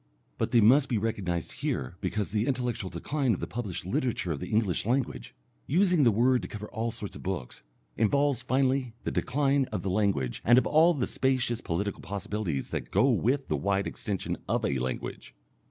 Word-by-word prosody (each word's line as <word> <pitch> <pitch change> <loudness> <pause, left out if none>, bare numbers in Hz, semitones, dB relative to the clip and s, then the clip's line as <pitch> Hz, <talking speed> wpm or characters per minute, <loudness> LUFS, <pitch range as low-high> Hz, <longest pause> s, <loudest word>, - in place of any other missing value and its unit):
But - - 0
they 120 -1 +4
must 130 +6 +5
be 120 - +1
recognized 95 -6 -2
here 65 +7 -2
because 105 -2 -2
the 110 +2 0
intellectual 125 -7 -1
decline 125 - 0
of - - -7
the - - -2
published 100 -8 -5
literature 95 -2 -1
of 75 - -2
the - - -6
English 105 -5 +1
language 130 +1 -1 0.3
using 180 0 +3
the 125 - +6
word 125 +4 +3
to - - -6
cover 105 0 -7
all 115 0 -2
sorts 105 -2 -6
of - - -9
books 90 -10 -4 0.4
involves 140 +4 +2
finally 130 -2 +1
the - - -2
decline 140 +1 +1
of 105 -7 -5
the 95 - -1
language 95 - 0
and 120 +3 +6
of 130 - +4
all 160 +3 +5
the 130 - 0
spacious 125 -3 0
political 100 +4 -2
possibilities 100 -7 -3
that - - -3
go - - +3
with 135 +4 +1
the - - 0
wide 100 0 0
extension 100 -3 -3
of - - +1
a 65 - 0
language. 65 0 -5
115 Hz, 190 wpm, -28 LUFS, 100-130 Hz, 0.4 s, the